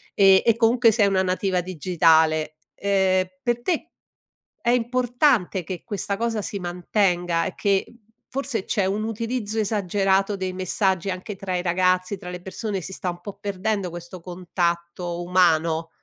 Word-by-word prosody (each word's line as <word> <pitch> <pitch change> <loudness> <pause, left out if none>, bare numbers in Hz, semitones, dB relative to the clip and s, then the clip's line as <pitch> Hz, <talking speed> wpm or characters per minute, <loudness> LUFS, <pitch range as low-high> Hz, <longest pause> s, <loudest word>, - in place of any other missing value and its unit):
ehm, 195 -1 +6
e 230 -1 +4
comunque 230 0 +4
sei 205 -1 +3
una 195 -1 +2
nativa 185 0 0
digitale, 160 -3 +2 0.2
ehm, 190 -2 +1 0.2
per 240 -1 0
te 330 +2 -1 0.7
è 235 - +1
importante 245 - +1
che 180 -1 -6
questa 205 -2 -2
cosa 230 -2 -1
si 200 - -4
mantenga 175 -1 0
e - - -3
che, 195 -1 +1
uhm, 235 - -18 0.3
forse 260 -6 -2
c'è 200 -4 0
un 205 +3 -1
utilizzo 225 0 -3
esagerato 195 -1 +1
dei 185 -1 -3
messaggi 185 0 0
anche 185 +3 -6
tra 185 -1 -4
i - - -1
ragazzi, 185 +2 +1
tra 180 - -9
le 180 0 -7
persone, 195 +2 -4
si 190 - -7
sta 185 - -3
un 175 0 -6
po' 200 +2 -7
perdendo 200 -1 -2
questo 175 +1 -9
contatto 175 -1 -3
umano? 165 -2 +2
190 Hz, 155 wpm, -24 LUFS, 180-215 Hz, 0.7 s, ehm